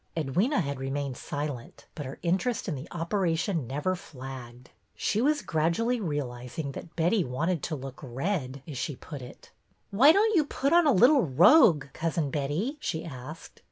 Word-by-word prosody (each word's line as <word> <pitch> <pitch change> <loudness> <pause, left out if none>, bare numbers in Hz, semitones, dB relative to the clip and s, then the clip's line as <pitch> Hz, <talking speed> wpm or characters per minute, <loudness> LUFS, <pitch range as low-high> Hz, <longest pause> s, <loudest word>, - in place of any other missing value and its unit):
Edwyna 180 - +1
had 140 -4 -4
remained 135 0 -3
silent, 145 -3 -6
but 150 -4 -6
her 135 - -8
interest 195 +7 0
in 175 - -1
the 140 +2 -7
operation 170 - -1
never 150 +8 -1
flagged. 130 -7 -10 0.2
She 215 - 0
was 295 +2 +2
grad 160 +1 +1
ually 235 +2 0
realizing 140 - -4
that 165 +4 -10
Betty 175 +4 +2
wanted 160 +5 -1
to 155 - -3
look 135 -1 -8
red," 135 0 -3
as 140 -5 -6
she 140 +2 -3
put 145 +1 -9
it. 125 - -12 0.4
Why 255 +10 +7
don't 425 +4 +3
you 320 - +5
put 275 +2 0
on 345 -2 +5
a - - +6
little 255 +6 +6
rogue. 170 - +6
Cousin 165 -3 -1
Betty?" 155 - -2
she 165 - -3
asked. 145 +1 -9
160 Hz, 170 wpm, -28 LUFS, 135-200 Hz, 0.4 s, Why